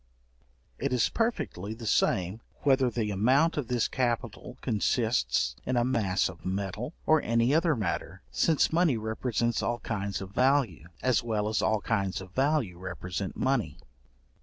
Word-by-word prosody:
It 140 Hz, +1 st, -1 dB
is 125 Hz, -3 st, +2 dB
perfectly 110 Hz, -, -2 dB
the 115 Hz, 0 st, -9 dB
same 95 Hz, 0 st, +1 dB, 0.2 s
whether 135 Hz, -3 st, +4 dB
the 110 Hz, -3 st, -2 dB
amount 130 Hz, -, +3 dB
of 145 Hz, -6 st, -2 dB
this 125 Hz, -2 st, +1 dB
capital 120 Hz, -1 st, -2 dB
consists 105 Hz, -, +1 dB
in 125 Hz, -, -1 dB
a 120 Hz, -, +3 dB
mass 105 Hz, -7 st, +1 dB
of 80 Hz, -, -10 dB
metal, 100 Hz, -, -3 dB
or 155 Hz, -1 st, +4 dB
any 115 Hz, +3 st, +2 dB
other 165 Hz, 0 st, +3 dB
matter, 105 Hz, -7 st, -3 dB
since 160 Hz, -1 st, +2 dB
money 165 Hz, -7 st, +3 dB
represents 115 Hz, +2 st, -1 dB
all 120 Hz, 0 st, -1 dB
kinds 100 Hz, -3 st, -3 dB
of 95 Hz, 0 st, -8 dB
value, 125 Hz, -, +2 dB, 0.2 s
as 125 Hz, -2 st, +3 dB
well 110 Hz, -3 st, -1 dB
as 110 Hz, +1 st, 0 dB
all 110 Hz, -1 st, +1 dB
kinds 100 Hz, -4 st, -1 dB
of 95 Hz, -1 st, -10 dB
value 130 Hz, -, 0 dB
represent 90 Hz, 0 st, -5 dB
money. 130 Hz, -4 st, 0 dB
115 Hz, 155 wpm, -29 LUFS, 100-130 Hz, 0.2 s, whether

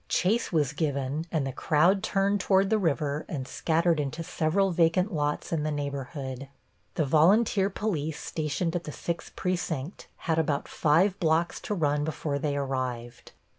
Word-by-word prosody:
Chase 220 Hz, +6 st, +1 dB
was 150 Hz, -5 st, +1 dB
given 145 Hz, +1 st, -2 dB
and 155 Hz, -5 st, 0 dB
the 135 Hz, -, -2 dB
crowd 165 Hz, +8 st, +3 dB
turned 200 Hz, +1 st, +1 dB
toward 195 Hz, +1 st, +2 dB
the 220 Hz, -, +3 dB
river 150 Hz, -4 st, 0 dB
and 130 Hz, -4 st, -4 dB
scattered 165 Hz, 0 st, +1 dB
into 150 Hz, +3 st, -3 dB
several 180 Hz, +3 st, +1 dB
vacant 175 Hz, +3 st, +2 dB
lots 150 Hz, -1 st, -1 dB
in 160 Hz, -, +1 dB
the 155 Hz, -, -1 dB
neighborhood. 140 Hz, -2 st, -4 dB, 0.5 s
The 155 Hz, -, +1 dB
volunteer 195 Hz, -, +4 dB
police 160 Hz, -7 st, -2 dB
stationed 160 Hz, +2 st, -2 dB
at 170 Hz, -, -2 dB
the 150 Hz, -, -5 dB
Sixth 170 Hz, +3 st, -5 dB
Precinct 175 Hz, -4 st, -3 dB, 0.2 s
had 165 Hz, -1 st, +2 dB
about 145 Hz, -3 st, 0 dB
five 175 Hz, +6 st, +2 dB
blocks 165 Hz, 0 st, +1 dB
to 210 Hz, -, -3 dB
run 150 Hz, -4 st, +1 dB
before 150 Hz, -2 st, -2 dB
they 145 Hz, -1 st, -1 dB
arrived. 125 Hz, -3 st, -4 dB
160 Hz, 160 wpm, -28 LUFS, 145-180 Hz, 0.5 s, volunteer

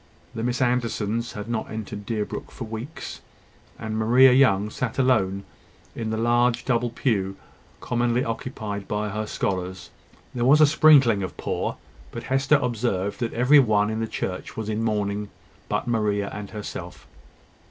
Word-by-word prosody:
The 115 Hz, -, -4 dB
Miss 125 Hz, +2 st, 0 dB
Andersons 115 Hz, -1 st, -1 dB
had 105 Hz, +1 st, -6 dB
not 115 Hz, -2 st, -3 dB
entered 105 Hz, -2 st, -6 dB
Deerbrook 105 Hz, -2 st, -3 dB
for -, -, -8 dB
weeks; 115 Hz, +8 st, -7 dB, 0.6 s
and 110 Hz, -1 st, -4 dB
Maria 125 Hz, +4 st, +6 dB
Young 105 Hz, -6 st, +4 dB
sat 125 Hz, -3 st, -3 dB
alone 100 Hz, -7 st, +2 dB, 0.5 s
in 115 Hz, -2 st, -3 dB
the 110 Hz, -, -2 dB
large 120 Hz, +1 st, +2 dB
double 120 Hz, -1 st, +1 dB
pew 100 Hz, -5 st, -1 dB, 0.5 s
commonly 120 Hz, 0 st, 0 dB
occupied 110 Hz, -3 st, -5 dB
by 105 Hz, 0 st, -2 dB
her 105 Hz, +1 st, -3 dB
scholars. 90 Hz, -3 st, -3 dB, 0.4 s
There 120 Hz, -, -2 dB
was 140 Hz, +5 st, +6 dB
a 155 Hz, -, +8 dB
sprinkling 145 Hz, -8 st, +5 dB
of 95 Hz, -, -5 dB
poor; -, -, -3 dB, 0.3 s
but -, -, -7 dB
Hester 135 Hz, +3 st, +2 dB
observed 110 Hz, -5 st, -1 dB
that 120 Hz, -3 st, -2 dB
every 125 Hz, +5 st, +6 dB
one 105 Hz, -4 st, +3 dB
in 110 Hz, -, -2 dB
the 115 Hz, -, -1 dB
church 90 Hz, -3 st, -5 dB
was 110 Hz, -1 st, -3 dB
in 110 Hz, +1 st, -1 dB
mourning 105 Hz, -2 st, -1 dB, 0.4 s
but -, -, -1 dB
Maria 105 Hz, -3 st, 0 dB
and 105 Hz, -1 st, -6 dB
herself. 105 Hz, -2 st, -7 dB
110 Hz, 155 wpm, -24 LUFS, 105-125 Hz, 0.6 s, a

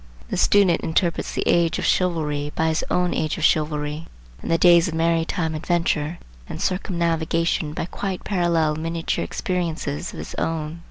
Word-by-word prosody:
The -, -, -2 dB
student 195 Hz, -5 st, +4 dB
interprets 165 Hz, +1 st, 0 dB
the -, -, 0 dB
age 170 Hz, -1 st, +3 dB
of -, -, -2 dB
chivalry 150 Hz, -5 st, 0 dB
by 160 Hz, 0 st, +1 dB
his 160 Hz, -, 0 dB
own 180 Hz, 0 st, +1 dB
age 155 Hz, -1 st, -1 dB
of 165 Hz, -, -4 dB
chivalry, 150 Hz, 0 st, 0 dB, 0.3 s
and -, -, -6 dB
the 165 Hz, -, +3 dB
days 175 Hz, 0 st, +6 dB
of 165 Hz, -, -4 dB
maritime 165 Hz, 0 st, 0 dB
adventure 165 Hz, -1 st, 0 dB, 0.3 s
and -, -, -6 dB
circumnavigation 165 Hz, -4 st, 0 dB
by 160 Hz, -, -3 dB
quite 190 Hz, +1 st, -4 dB
parallel 170 Hz, -5 st, +1 dB
miniature 165 Hz, +1 st, -2 dB
experiences 170 Hz, -3 st, -3 dB
of -, -, -10 dB
his -, -, -7 dB
own. 160 Hz, 0 st, -2 dB
165 Hz, 160 wpm, -23 LUFS, 155-175 Hz, 0.3 s, days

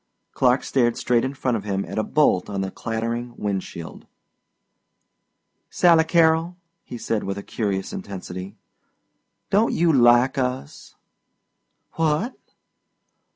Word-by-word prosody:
Clark 125 Hz, +1 st, +2 dB
stared 120 Hz, -3 st, +1 dB
straight 120 Hz, -1 st, +1 dB
in 130 Hz, +1 st, -3 dB
front 130 Hz, -3 st, -1 dB
of 105 Hz, -, -3 dB
him 100 Hz, -1 st, -2 dB
at -, -, -4 dB
a -, -, +1 dB
bolt 145 Hz, -12 st, +2 dB
on 100 Hz, -1 st, -2 dB
the 95 Hz, 0 st, -3 dB
clattering 115 Hz, +1 st, -4 dB
wind 100 Hz, -2 st, -2 dB
shield. 85 Hz, -1 st, -10 dB, 1.6 s
"Sally 170 Hz, -2 st, +4 dB
Carrol," 165 Hz, +1 st, +2 dB, 0.3 s
he 120 Hz, -, -8 dB
said 115 Hz, -2 st, -2 dB
with 100 Hz, 0 st, -4 dB
a 100 Hz, -, -6 dB
curious 100 Hz, -4 st, -3 dB
intensity, 95 Hz, 0 st, -7 dB, 1.0 s
"don't 210 Hz, +4 st, +3 dB
you 170 Hz, -1 st, +3 dB
'like 120 Hz, +1 st, +4 dB
us?" 125 Hz, -, -4 dB, 1.0 s
"What?" 165 Hz, -, +1 dB
120 Hz, 125 wpm, -23 LUFS, 100-150 Hz, 1.6 s, Sally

